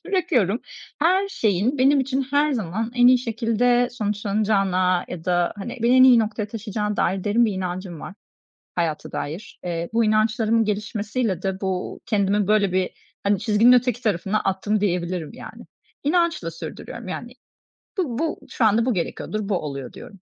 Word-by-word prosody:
bırakıyorum. 270 Hz, -, +1 dB, 0.4 s
Her 370 Hz, +6 st, +2 dB
şeyin 230 Hz, -, 0 dB
benim 275 Hz, +2 st, +4 dB
için 270 Hz, +1 st, -1 dB
her 290 Hz, +1 st, +2 dB
zaman 220 Hz, 0 st, -3 dB
en 245 Hz, 0 st, +5 dB
iyi 250 Hz, 0 st, +7 dB
şekilde 240 Hz, +1 st, +1 dB
sonuçlanacağına 200 Hz, -4 st, 0 dB
ya 165 Hz, -2 st, -7 dB
da 175 Hz, -1 st, +1 dB
hani, 235 Hz, +6 st, -6 dB
beni 240 Hz, +2 st, +4 dB
en 255 Hz, -, +8 dB
iyi 250 Hz, -3 st, +7 dB
noktaya 215 Hz, -1 st, -1 dB
taşıyacağına 210 Hz, -1 st, -3 dB
dair 190 Hz, +1 st, 0 dB
derin 220 Hz, +3 st, +3 dB
bir 220 Hz, -, +1 dB
inancım 185 Hz, -2 st, -5 dB
var -, -, -8 dB, 0.6 s
hayata 165 Hz, -3 st, -2 dB
dair. 160 Hz, +9 st, -6 dB
Eee, 170 Hz, -1 st, -3 dB
bu 230 Hz, -1 st, +3 dB
inançlarımın 220 Hz, +1 st, +2 dB
gelişmesiyle 210 Hz, -1 st, -2 dB
de 190 Hz, 0 st, -3 dB
bu 190 Hz, -2 st, -3 dB
kendimi 200 Hz, -1 st, +1 dB
böyle 210 Hz, -2 st, +3 dB
bir, 185 Hz, -1 st, +1 dB, 0.3 s
hani, 200 Hz, -1 st, +2 dB
çizginin 220 Hz, +2 st, +4 dB
öteki 250 Hz, -1 st, +2 dB
tarafına 205 Hz, 0 st, 0 dB
attım 200 Hz, +2 st, -1 dB
diyebilirim 175 Hz, -4 st, -1 dB
yani. -, -, -11 dB, 0.4 s
İnançla 330 Hz, -, +1 dB
sürdürüyorum 165 Hz, +6 st, -8 dB
yani, 240 Hz, +6 st, -6 dB, 0.7 s
"Bu 265 Hz, -11 st, -1 dB
bu 320 Hz, 0 st, -2 dB
şu 235 Hz, -, -1 dB
anda 220 Hz, +1 st, +4 dB
bu 255 Hz, -, +1 dB
gerekiyordur, 200 Hz, +3 st, -3 dB
bu 205 Hz, -, +1 dB
oluyor," 140 Hz, -4 st, -6 dB
diyorum 195 Hz, -, -12 dB
215 Hz, 160 wpm, -23 LUFS, 190-245 Hz, 0.7 s, en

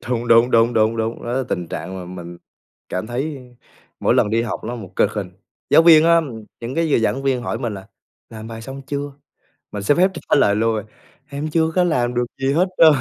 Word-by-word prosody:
Thúng, 120 Hz, -1 st, -3 dB
đúng, 115 Hz, +2 st, +5 dB
đúng, 115 Hz, 0 st, +4 dB
đúng, 110 Hz, 0 st, +2 dB
đúng, 115 Hz, +1 st, -3 dB
đó 120 Hz, -, -3 dB
là 130 Hz, +1 st, 0 dB
tình 85 Hz, -2 st, -3 dB
trạng 95 Hz, -, -6 dB
mà 90 Hz, -, -7 dB, 0.2 s
mình 85 Hz, 0 st, -10 dB, 0.5 s
cảm 90 Hz, +3 st, -3 dB
thấy 135 Hz, +5 st, -3 dB, 0.6 s
mỗi -, -, +2 dB
lần 105 Hz, -, +2 dB
đi 115 Hz, +1 st, +1 dB
học 115 Hz, -, -4 dB
nó 120 Hz, +2 st, -4 dB
một 100 Hz, -5 st, -10 dB
cực 105 Hz, -, +2 dB
hình. 100 Hz, -4 st, -4 dB, 0.4 s
Giáo -, -, +7 dB
viên 160 Hz, -2 st, +7 dB
á, 170 Hz, 0 st, +5 dB, 0.4 s
những 120 Hz, +2 st, -5 dB
cái 165 Hz, +1 st, 0 dB
giờ -, -, +4 dB
giảng 120 Hz, +4 st, 0 dB
viên 130 Hz, -3 st, 0 dB
hỏi -, -, -3 dB
mình 115 Hz, -3 st, -3 dB
là 95 Hz, -1 st, -10 dB, 0.4 s
"Làm 110 Hz, -1 st, -9 dB
bài 115 Hz, -1 st, -8 dB
xong 135 Hz, +3 st, -8 dB
chưa?" 145 Hz, +1 st, -4 dB, 0.6 s
Mình 105 Hz, -, -5 dB
xin 125 Hz, +8 st, +2 dB
phép 185 Hz, +2 st, +4 dB
trả 165 Hz, -, 0 dB
lời 100 Hz, 0 st, +3 dB
luôn 115 Hz, +1 st, +1 dB
à: 105 Hz, -, -6 dB, 0.4 s
"Em 145 Hz, +2 st, -4 dB
chưa 160 Hz, +1 st, +1 dB
có 180 Hz, -, +3 dB
làm 125 Hz, -8 st, 0 dB
được 120 Hz, 0 st, +1 dB
gì 135 Hz, +1 st, 0 dB
hết 175 Hz, +6 st, +2 dB
trơn." 160 Hz, -2 st, +8 dB
120 Hz, 235 wpm, -20 LUFS, 110-145 Hz, 0.6 s, trơn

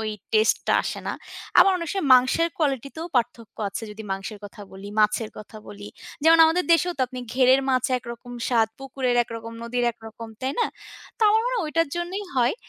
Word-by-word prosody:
ওই 220 Hz, -1 st, -2 dB, 0.2 s
টেস্টটা 220 Hz, 0 st, +2 dB
আসে -, -, -4 dB
না। -, -, -1 dB, 0.5 s
আবার 390 Hz, -, +7 dB
অনেক 335 Hz, -, -5 dB
সময়ই 385 Hz, -7 st, -2 dB
মাংসের 260 Hz, +7 st, +3 dB
কোয়ালিটিতেও 285 Hz, +2 st, -2 dB
পার্থক্য 235 Hz, -2 st, -2 dB
আছে, 210 Hz, -, -6 dB
যদি 215 Hz, +1 st, -9 dB
মাংসের 195 Hz, +2 st, -6 dB
কথা 205 Hz, +1 st, -11 dB
বলি, 195 Hz, +1 st, -9 dB
মাছের 215 Hz, +1 st, +1 dB
কথা 215 Hz, +1 st, -11 dB
বলি। 205 Hz, 0 st, -9 dB, 0.3 s
যেমন, 325 Hz, +1 st, +6 dB
আমাদের 355 Hz, +3 st, +1 dB
দেশেও 355 Hz, +2 st, +3 dB
তো -, -, -3 dB
আপনি 255 Hz, -1 st, -7 dB
ঘেড়ের 260 Hz, +1 st, +5 dB
মাছ 255 Hz, -1 st, +1 dB
একরকম 235 Hz, +1 st, -10 dB, 0.2 s
স্বাদ, 225 Hz, -3 st, +3 dB
পুকুরের 260 Hz, -2 st, -2 dB
একরকম, 230 Hz, 0 st, -8 dB
নদীর 245 Hz, +1 st, -1 dB
একরকম, 225 Hz, +1 st, -11 dB
তাই 260 Hz, +1 st, -2 dB
না? -, -, +3 dB, 0.5 s
তো -, -, -40 dB
আমার 440 Hz, +1 st, +4 dB
মনে -, -, -1 dB
হয়, 390 Hz, -, -1 dB
ওইটার 330 Hz, +1 st, 0 dB
জন্যই 365 Hz, +4 st, -3 dB
হয়। 245 Hz, +5 st, +3 dB
250 Hz, 190 wpm, -24 LUFS, 225-320 Hz, 0.5 s, আবার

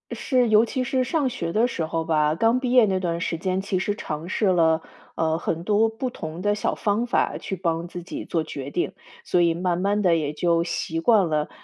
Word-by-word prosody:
是 255 Hz, -3 st, +1 dB
尤 215 Hz, +1 st, +6 dB
其 255 Hz, +2 st, -2 dB
是 255 Hz, +1 st, 0 dB
上 290 Hz, +1 st, 0 dB
学 170 Hz, -9 st, -4 dB
的 220 Hz, +3 st, +3 dB
时 165 Hz, -9 st, -3 dB
候 165 Hz, +1 st, -2 dB
吧， 155 Hz, -1 st, +2 dB
刚 225 Hz, +7 st, +2 dB
毕 255 Hz, -1 st, -2 dB
业 250 Hz, -3 st, +6 dB
那 190 Hz, -2 st, 0 dB
段 170 Hz, -2 st, -2 dB
时 170 Hz, -1 st, -2 dB
间 185 Hz, +2 st, -1 dB
其 195 Hz, -1 st, -1 dB
实 205 Hz, +2 st, -1 dB
尝 155 Hz, -4 st, -5 dB
试 210 Hz, -, 0 dB
了， 165 Hz, -3 st, +3 dB, 0.3 s
呃， 160 Hz, 0 st, 0 dB
很 165 Hz, -1 st, -3 dB
多 215 Hz, +3 st, +3 dB
不 230 Hz, +3 st, -4 dB
同 160 Hz, -4 st, -7 dB
的 205 Hz, +1 st, +2 dB
小 205 Hz, -, -1 dB
方 215 Hz, +3 st, 0 dB
法 -, -, +1 dB
去 190 Hz, -, -4 dB
帮 170 Hz, -2 st, -2 dB
自 175 Hz, 0 st, -8 dB
己 185 Hz, -, -6 dB
做 165 Hz, -2 st, -1 dB
决 140 Hz, -3 st, -6 dB
定， 175 Hz, -, -1 dB, 0.3 s
所 180 Hz, -, +2 dB
以 170 Hz, -1 st, +3 dB
慢 175 Hz, 0 st, -1 dB
慢 200 Hz, +2 st, +1 dB
地 175 Hz, -2 st, +4 dB
也 150 Hz, -2 st, -1 dB
就 170 Hz, +2 st, +1 dB
习 165 Hz, -1 st, -3 dB
惯 200 Hz, -2 st, +4 dB
了， 150 Hz, -1 st, 0 dB
180 Hz, 245 characters per minute, -24 LUFS, 165-215 Hz, 0.3 s, 尤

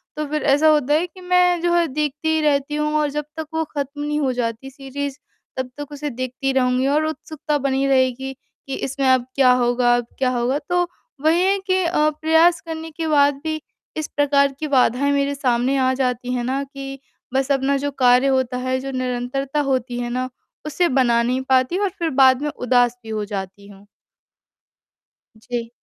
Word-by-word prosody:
तो 305 Hz, 0 st, -2 dB
फ़िर 305 Hz, +1 st, -2 dB
ऐसा 290 Hz, +3 st, +4 dB
होता 295 Hz, -2 st, +3 dB
है 330 Hz, +4 st, +2 dB
कि 370 Hz, +1 st, -16 dB
मैं 360 Hz, -1 st, +3 dB
जो 345 Hz, 0 st, +1 dB
है 345 Hz, -1 st, +3 dB
देखती 305 Hz, +2 st, 0 dB
रहती 295 Hz, -1 st, +1 dB
हूँ 300 Hz, 0 st, -1 dB
और 300 Hz, -1 st, +1 dB
जब 300 Hz, 0 st, -3 dB
तक 320 Hz, -1 st, -4 dB
वो 320 Hz, -, 0 dB
खत्म 285 Hz, +1 st, -3 dB
नहीं 295 Hz, 0 st, -1 dB
हो 270 Hz, -3 st, +1 dB
जाती 240 Hz, +1 st, -3 dB
सीरीज़ 275 Hz, +1 st, -6 dB, 0.4 s
तब 260 Hz, -1 st, -3 dB
तक 290 Hz, 0 st, -7 dB
उसे 295 Hz, 0 st, -4 dB
देखती 255 Hz, +1 st, -3 dB
रहूँगी 255 Hz, 0 st, +2 dB
और 300 Hz, +3 st, +2 dB
उत्सुकता 310 Hz, -1 st, -3 dB
बनी 275 Hz, -1 st, 0 dB
रहेगी 265 Hz, 0 st, +1 dB, 0.3 s
कि 270 Hz, -, -3 dB
इसमें 270 Hz, 0 st, -2 dB
अब 255 Hz, -1 st, +3 dB
क्या 260 Hz, -2 st, +5 dB
होगा 245 Hz, 0 st, +3 dB
अब 240 Hz, -1 st, -1 dB
क्या 260 Hz, -1 st, +2 dB
होगा। 255 Hz, +3 st, 0 dB
तो 355 Hz, 0 st, +2 dB, 0.4 s
वही 330 Hz, +3 st, +4 dB
है 390 Hz, +1 st, +3 dB
कि 370 Hz, 0 st, +2 dB
अ, 305 Hz, -3 st, +2 dB
प्रयास 320 Hz, +1 st, +4 dB
करने 325 Hz, 0 st, -6 dB
के 320 Hz, +1 st, -4 dB
बाद 285 Hz, -2 st, +4 dB
भी 315 Hz, -1 st, -3 dB, 0.4 s
इस 310 Hz, -, -2 dB
प्रकार 280 Hz, -1 st, +3 dB
की 310 Hz, -, -3 dB
बाधाएँ 255 Hz, +3 st, +3 dB
मेरे 280 Hz, 0 st, 0 dB
सामने 255 Hz, 0 st, +1 dB
आ 260 Hz, -, +2 dB
जाती 250 Hz, -1 st, -1 dB
हैं 245 Hz, -1 st, -1 dB
ना, 265 Hz, +3 st, -1 dB
कि 275 Hz, 0 st, -8 dB, 0.3 s
बस 270 Hz, +1 st, 0 dB
अपना 275 Hz, 0 st, +2 dB
जो 285 Hz, +1 st, -2 dB
कार्य 255 Hz, 0 st, +4 dB
होता 260 Hz, -2 st, +1 dB
है, 255 Hz, +1 st, -1 dB
जो 270 Hz, +1 st, -5 dB
निरंतरता 255 Hz, +2 st, -2 dB
होती 245 Hz, -1 st, -2 dB
है 240 Hz, 0 st, -3 dB
ना 255 Hz, +1 st, -2 dB, 0.4 s
उसे 345 Hz, +4 st, +1 dB
बना 245 Hz, -3 st, +3 dB
नहीं 255 Hz, +2 st, 0 dB
पाती 260 Hz, +7 st, +3 dB
और 405 Hz, -1 st, +1 dB
फ़िर 335 Hz, -1 st, 0 dB
बाद 260 Hz, +1 st, +5 dB
में 295 Hz, -, -1 dB
उदास 245 Hz, -1 st, +2 dB
भी 225 Hz, -, -11 dB
हो 215 Hz, -1 st, -2 dB
जाती 200 Hz, -1 st, -6 dB
हूँ। 200 Hz, 0 st, -16 dB, 1.6 s
जी। 235 Hz, -1 st, -2 dB
275 Hz, 195 wpm, -21 LUFS, 255-300 Hz, 1.6 s, क्या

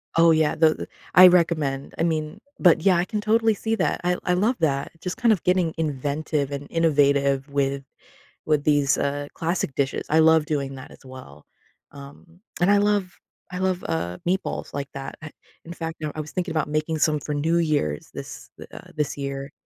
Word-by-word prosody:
Oh, 165 Hz, 0 st, +6 dB
yeah, 155 Hz, -1 st, +2 dB
though 155 Hz, -1 st, +4 dB
the -, -, -8 dB, 0.3 s
I 185 Hz, 0 st, +10 dB
recommend. 155 Hz, -6 st, +1 dB
I -, -, 0 dB
mean 155 Hz, -2 st, -2 dB, 0.2 s
but, 175 Hz, -3 st, +5 dB
yeah, 190 Hz, 0 st, +4 dB
I 170 Hz, -, +2 dB
can 215 Hz, 0 st, -3 dB
totally 220 Hz, +1 st, +2 dB
see 225 Hz, +2 st, -2 dB
that. -, -, 0 dB
I 180 Hz, 0 st, +1 dB
I 180 Hz, -, +2 dB
love 215 Hz, +8 st, +1 dB
that. 140 Hz, -4 st, 0 dB
Just 180 Hz, +6 st, -4 dB
kind 235 Hz, -3 st, +4 dB
of 195 Hz, -, -4 dB
getting 180 Hz, -3 st, +1 dB
inventive 145 Hz, -1 st, -2 dB
and 140 Hz, 0 st, -5 dB
innovative 140 Hz, -4 st, +2 dB
with 140 Hz, -1 st, -1 dB, 0.6 s
with 150 Hz, -2 st, +1 dB
these, 145 Hz, -2 st, +3 dB
uh, 145 Hz, 0 st, -2 dB
classic 165 Hz, -4 st, -2 dB
dishes. 140 Hz, 0 st, -1 dB
I 160 Hz, +1 st, +4 dB
love 160 Hz, -1 st, +4 dB
doing 140 Hz, -3 st, -3 dB
that 130 Hz, -, -11 dB
as -, -, -17 dB
well, 130 Hz, -, -12 dB, 0.5 s
um, 145 Hz, +5 st, -14 dB, 0.2 s
and 175 Hz, +3 st, +3 dB
I 205 Hz, -, +5 dB
love 205 Hz, -3 st, 0 dB, 0.4 s
I 180 Hz, -, -4 dB
love, 185 Hz, -1 st, -1 dB
uh, 90 Hz, -, -3 dB
meatballs 190 Hz, +2 st, -2 dB
like 140 Hz, -1 st, -4 dB
that. 135 Hz, 0 st, -7 dB
I 155 Hz, -, -8 dB, 0.3 s
in 170 Hz, -, -8 dB
fact, 165 Hz, -1 st, -6 dB
now, 155 Hz, -1 st, -3 dB
I 155 Hz, -, -5 dB
was 150 Hz, +1 st, -7 dB
thinking 180 Hz, -2 st, -2 dB
about 155 Hz, -2 st, -1 dB
making 155 Hz, +1 st, -1 dB
some 155 Hz, 0 st, +2 dB
for 150 Hz, -, -5 dB
New 160 Hz, +4 st, +1 dB
Year's 145 Hz, -, -1 dB
this -, -, -9 dB
the, -, -, -10 dB
uh, -, -, -13 dB
this 150 Hz, -1 st, -2 dB
year. 140 Hz, 0 st, -5 dB
155 Hz, 200 wpm, -24 LUFS, 140-175 Hz, 0.6 s, I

